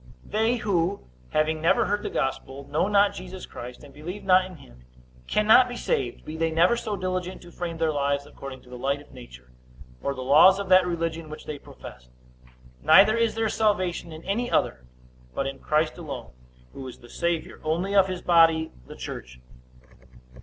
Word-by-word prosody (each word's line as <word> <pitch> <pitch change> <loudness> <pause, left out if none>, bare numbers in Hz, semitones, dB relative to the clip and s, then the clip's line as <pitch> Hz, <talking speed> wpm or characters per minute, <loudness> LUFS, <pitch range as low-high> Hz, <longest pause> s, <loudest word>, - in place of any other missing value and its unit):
They 225 +3 +1
who, 195 -4 0 0.3
having 155 0 0
never 165 - +3
heard 205 +1 0
the - - -4
gospel, 135 +1 -3
know 150 +6 +1
not 205 -1 +4
Jesus 185 0 -8
Christ, 125 +3 -9
and 140 -1 -14
believe 175 +7 -7
not 185 -1 +5
in 185 -1 -10
him, 60 - -17 0.4
cannot 220 +4 +5
be 245 - -6
saved, 405 -6 -2
be 155 - -6
they 165 0 0
never 170 +8 +4
so 215 -3 -3
diligent 185 -1 -4
to 175 - -13
frame 170 -1 -5
their 160 -1 +1
lives 140 0 0
according 135 -2 -10
to - - -18
the 125 - -8
light 140 +2 0
of 145 - -17
nature, 65 - -13 0.5
or 140 - -2
the 130 - -5
laws 155 +8 +7
of 200 -2 -5
that 185 -1 +6
religion 165 -2 -3
which 155 - -9
they 150 -2 -6
profess; 60 - -13 0.7
neither 195 +7 +7
is 230 -1 +1
there 225 0 +1
salvation 185 -6 0
in 160 +1 -10
any 235 +5 -1
other, 60 0 0 0.5
but 140 - -1
in 135 0 -5
Christ 155 +2 0
alone, 155 -5 -7 0.4
who 135 - -8
is 125 - -9
the 120 - -16
Savior 170 +5 -3
only 170 +6 -1
of 195 -2 +5
his 185 -1 -5
body 165 -2 +4 0.2
the - - -10
church. 60 0 -8
165 Hz, 190 wpm, -26 LUFS, 140-195 Hz, 0.7 s, laws